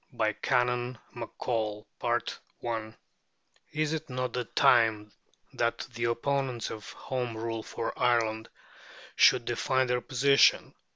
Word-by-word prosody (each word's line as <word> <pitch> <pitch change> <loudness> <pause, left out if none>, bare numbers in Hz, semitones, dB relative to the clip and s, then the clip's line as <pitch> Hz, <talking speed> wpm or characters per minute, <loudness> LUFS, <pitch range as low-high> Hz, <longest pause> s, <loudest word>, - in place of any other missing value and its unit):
BY 110 -2 +1
CANON 125 -1 +1 0.2
MACCOLL 110 -2 -3 1.9
Is 155 0 0
it 160 -1 -4
not 125 -1 -3
time 110 -3 +4 0.4
that 115 0 0 0.2
the 115 0 -2
opponents 125 0 -1
of 110 -2 -8
Home 125 -3 -4
Rule 115 0 -3
for 115 - -4
Ireland 115 -3 +1 0.7
should - - +5
define 130 +2 +1
their 125 0 0
position? 140 +2 +4
120 Hz, 105 wpm, -29 LUFS, 115-130 Hz, 1.9 s, should